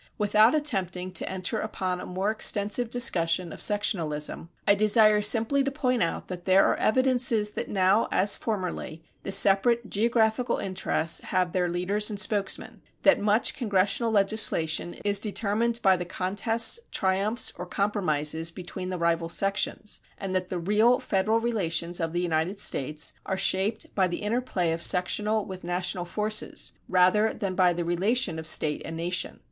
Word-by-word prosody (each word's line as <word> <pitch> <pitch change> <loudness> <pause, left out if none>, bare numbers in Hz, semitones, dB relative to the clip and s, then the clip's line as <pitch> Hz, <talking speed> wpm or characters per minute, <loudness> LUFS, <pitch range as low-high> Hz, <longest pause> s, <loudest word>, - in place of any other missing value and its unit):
Without 215 +4 +3
attempting 185 - -1
to - - -1
enter 190 +3 -2
upon 185 -4 -3
a - - -8
more 190 +3 -2
extensive 215 +2 +1
discussion 180 -8 +2
of - - -10
sectionalism, 165 -7 0 0.2
I - - +6
desire 215 +1 +4
simply 225 +6 +2
to 275 - -1
point 255 -3 -1
out 170 - -2
that 180 -1 -7
there 190 +1 +4
are - - +2
evidences 245 -3 +2
that - - -5
now, 195 +2 +2
as 200 +2 +3
formerly, 180 -6 -5 0.2
the - - -5
separate 220 +5 +3
geographical 225 +2 +1
interests 175 -3 -1
have 180 -2 -1
their 180 -1 0
leaders 195 +5 -1
and 205 -2 -5
spokesmen, 205 -2 -2 0.2
that 290 - +5
much 210 +2 +2
Congressional 210 0 0
legislation 195 -6 +1
is 200 -1 +3
determined 220 +2 -1
by 190 -2 +5
the 175 - -4
contests, 225 - +1
triumphs, 195 +5 0
or 180 - -8
compromises 165 -6 0
between 185 +1 -7
the 185 - -4
rival 170 -1 0
sections, 195 +3 -2 0.2
and 195 -1 -5
that 185 -1 -2
the 185 - -3
real 215 +8 +2
federal 220 -2 0
relations 175 -7 -1
of 165 -1 -2
the 175 +1 -2
United 175 +3 -1
States 150 -4 -2
are 190 - -2
shaped 200 +4 -1
by 190 -2 +2
the 175 +3 -5
interplay 210 -6 -1
of 165 +1 -3
sectional 210 +5 +1
with 185 -1 -9
national 175 0 -2
forces 210 +4 -1 0.2
rather 185 +4 +3
than 195 -2 -3
by 180 -1 +3
the 175 0 -3
relation 185 +1 0
of 160 - -7
State 150 -1 +2
and 165 0 -7
Nation. 175 +2 -2
195 Hz, 160 wpm, -26 LUFS, 180-215 Hz, 0.2 s, I